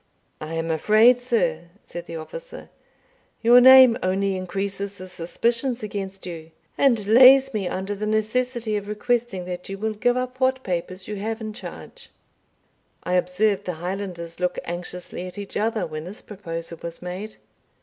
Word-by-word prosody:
"I 155 +1 -6
am 165 0 -2
afraid, 215 +9 +5
sir," 470 - 0 0.2
said 175 0 -8
the 165 - -7
officer, - - -9 0.7
"your 240 +2 +8
name 260 -2 +9
only 190 +1 0
increases 195 +2 -4
the 185 - -9
suspicions 230 +8 -2
against 195 -2 -5
you, 165 -3 -7 0.3
and 235 -7 +3
lays 260 +4 +7
me 200 -4 -1
under 190 +3 -3
the 210 +1 -4
necessity 220 +1 0
of 205 0 -6
requesting 215 -3 -1
that 180 0 -6
you 195 - -5
will 220 +2 -2
give 245 +4 +1
up 255 0 -4
what 260 0 +1
papers 185 +1 -4
you 210 - -4
have 220 +3 -3
in 215 -1 -6
charge." 475 - -10 0.9
I 180 - -2
observed 190 +3 +1
the 180 - -2
Highlanders 175 -1 -5
look 180 0 -1
anxiously 175 +1 -5
at 180 - -10
each 200 -1 -7
other 220 +1 0
when 155 0 -6
this 205 +7 -8
proposal 170 -5 -7
was 170 +1 -7
made. 190 +5 -6
200 Hz, 160 wpm, -24 LUFS, 180-235 Hz, 0.9 s, name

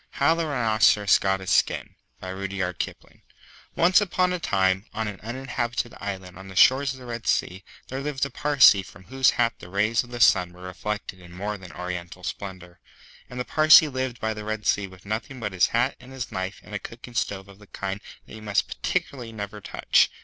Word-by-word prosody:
HOW 140 +4 +3
THE 165 -1 -1
RHINOCEROS 110 -6 +4
GOT 95 0 0
HIS 95 - -3
SKIN - - +1 1.8
ONCE 180 +4 +5
upon 180 -2 +1
a 180 - -2
time, 95 - +1
on 110 0 -1
an 105 -2 -6
uninhabited 120 0 -3
island 95 -2 -6
on 95 - -10
the 95 - -10
shores 135 +7 +5
of - - -13
the 125 - -11
Red 120 -1 -6
Sea, 95 +2 0 0.3
there 135 +1 -4
lived 140 -1 -1
a 140 - -7
Parsee 140 -9 +6
from 95 0 -14
whose 130 +5 +3
hat 115 -1 +3
the 90 - -11
rays 110 +5 +1
of 120 - -14
the 120 0 -6
sun 90 -6 +4
were 90 0 -14
reflected 95 +1 -5
in 90 -1 -14
more 100 +4 -4
than 95 -4 -11
oriental 90 +1 -6
splendour. 90 -2 -7 0.5
And 125 - -7
the 125 - -2
Parsee 155 0 +7
lived 130 -2 -3
by 110 0 -1
the 105 0 -7
Red 110 0 -4
Sea 100 -1 +2
with 95 0 -16
nothing 110 +5 -4
but 105 -4 -4
his 90 - +4
hat 120 +3 0
and 125 0 -14
his 130 -2 -6
knife 95 +1 -4
and 105 - -13
a 105 - -2
cooking 120 +3 -10
stove 100 -4 -2
of 100 0 -15
the 105 - -16
kind 100 +1 -5 0.2
that - - -14
you 110 - -9
must 105 -2 0
particularly 120 -4 -3
never 105 -1 -7
touch. - - +2
105 Hz, 205 wpm, -25 LUFS, 95-125 Hz, 1.8 s, Parsee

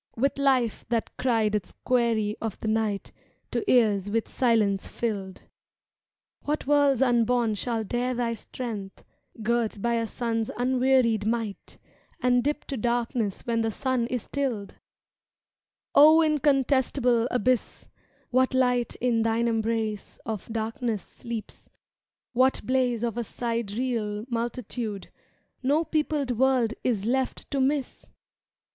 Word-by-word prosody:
With 275 +4 0
life 260 -5 +2
that 230 -2 -1
cried 225 -4 +1
its 205 -4 -3
query 230 -4 +1
of 225 -3 -4
the - - -4
night 215 -2 -1 0.4
To - - -1
ears 205 -5 +3
with 225 +1 0
silence 215 -6 +1
filled! 200 -5 -3
^^ - - -19 1.0
What 300 +1 -2
worlds 280 -2 +4
unborn 240 -2 +2
shall 225 +2 -2
dare 245 +4 -1
thy 235 -1 0
strength, 215 -3 -7 0.3
^y 225 - -8
Girt 230 -2 0
by 235 +3 0
a 230 -1 0
sun's 225 -1 -2
unwearied 250 -3 +2
might. 225 -3 -3 0.4
And 245 -3 +3
dip 295 +2 -1
to 275 - -4
darkness 235 -2 -1
when 230 -1 +1
the 225 - 0
sun 250 +1 -1
is 250 -2 -2
stilled! 250 -8 -3 1.2
O 310 +3 +8
incontestable 270 -5 +2
Abyss, 250 0 0 0.5
What 260 +1 +2
light 250 -2 +2
in 235 -2 +1
thine 230 +1 +1
embrace 225 -2 -1
of 220 0 -5
darkness 225 -1 -2
sleeps— 230 -2 -8 0.6
What 255 +2 +3
blaze 250 -3 +1
of 235 0 -1
a - - -1
sidereal 230 -1 -2
multitude 230 -3 -4
^^ - - -47 0.5
No 290 +5 +2
peopled 300 -4 0
world 255 -4 +3
is 215 -5 0
left 260 +2 -1
to 275 - 0
miss! 275 0 -1
235 Hz, 130 wpm, -26 LUFS, 220-255 Hz, 1.2 s, O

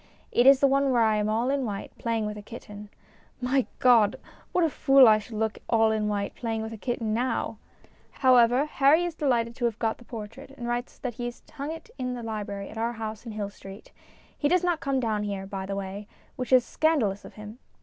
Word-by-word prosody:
It 245 - +4
is 275 -1 +7
the - - +6
one 275 0 +2
where 240 -3 +3
I 220 -1 +3
am 210 0 0
all 230 +4 +1
in 280 -1 0
white, 205 -4 -5
playing 230 -2 -1
with 210 0 -4
a 210 - -8
kitten. 210 -1 -10 0.5
My 255 +1 +1
God! 235 -6 +5 0.4
What 360 - +2
a 325 - +3
fool 270 -3 +6
I 215 -1 +6
should 220 +2 -10
look 220 0 -1
all 225 -1 +4
in 215 -1 0
white, 205 -1 -2
playing 225 -2 -3
with 220 +1 -6
a - - -7
kitten 230 -1 -2
now! 245 +3 -1 0.5
However, 250 0 +4
Harry 305 +3 +3
is 345 - -3
delighted 240 -7 0
to 245 - -1
have 230 -2 -1
got 225 -1 -1
the - - -14
portrait, 230 +3 -9
and 240 - -5
writes 240 +1 -3
that 250 -2 -4
he 240 +2 -5
has 240 0 -7
hung 290 +1 -4
it 330 +9 -9
in 250 -1 -2
the 240 - -7
library 205 -3 -5
at 220 - -8
our 230 +1 -1
house 220 0 -6
in 225 - -6
Hill 205 -1 -4
Street. 195 +1 -12 0.4
He 290 - 0
does 360 +3 +2
not 350 -3 +1
come 275 -2 0
down 220 -4 -1
here, 200 -2 -4
by 195 -1 -5
the 195 - -3
way, 200 +1 -6 0.3
which 250 -1 -5
is 255 -2 +6
scandalous 245 -12 +1
of - - -12
him. 215 +2 -10
230 Hz, 230 wpm, -27 LUFS, 215-260 Hz, 0.5 s, is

